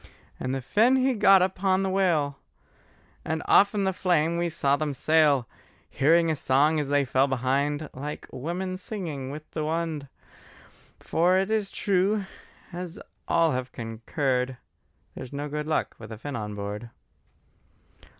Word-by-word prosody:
And 130 +1 -2
the 135 - -3
Finn 225 - +3
he 260 0 +2
got 195 -4 +6
upon 190 +1 +1
the 190 - 0
whale, 165 -8 +1 0.8
And 160 0 -2
off 200 +1 +5
in 200 - +1
the 190 0 +1
flame 170 -3 +1
we 170 0 0
saw 140 -4 +1
them 145 -1 -2
sail; 150 -4 +3 0.4
Hearing 165 +4 +3
a - - 0
song 145 +3 +2
as 145 - -2
they 145 0 +2
fell 130 +2 +2
behind, 140 +3 0
Like 145 +3 -6
women 180 +7 -4
singing 170 -10 -5
with 150 +2 -9
the 155 - -3
wind: 160 -2 -2 0.9
For 180 +3 +2
it 195 +3 0
is 215 -3 0
true, 200 +1 +1 0.5
as 175 -1 -6 0.3
all 165 -1 +3
have 130 -1 -3
concurred, 125 +3 -2 0.6
There's 125 - -8
no 145 +1 -3
good 150 +1 -4
luck 155 - 0
with 115 0 -10
a 110 - -6
Finn 140 +5 -6
on 105 -2 -4
board. 105 +3 -5
155 Hz, 155 wpm, -26 LUFS, 135-185 Hz, 0.9 s, got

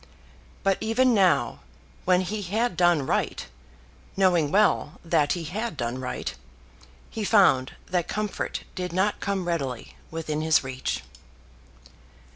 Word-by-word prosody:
But 195 -1 +2
even 245 +3 +3
now, 190 -5 +3 0.5
when 180 0 +4
he 205 +3 -3
had 210 +3 -1
done 175 -5 +3
right, - - -1 0.7
knowing 175 -6 +3
well 195 -5 +2
that 160 -3 +2
he 175 - -4
had 195 +2 -4
done 120 +1 -2
right, 125 - -4 0.8
he 220 - -4
found 190 - +4
that 180 -2 -1
comfort 210 -1 -3
did 180 -2 -4
not 190 +3 +1
come 195 -3 -2
readily 140 -8 -3
within 155 -2 -3
his 160 -1 +3
reach. 130 -1 -3
180 Hz, 125 wpm, -26 LUFS, 155-200 Hz, 0.8 s, when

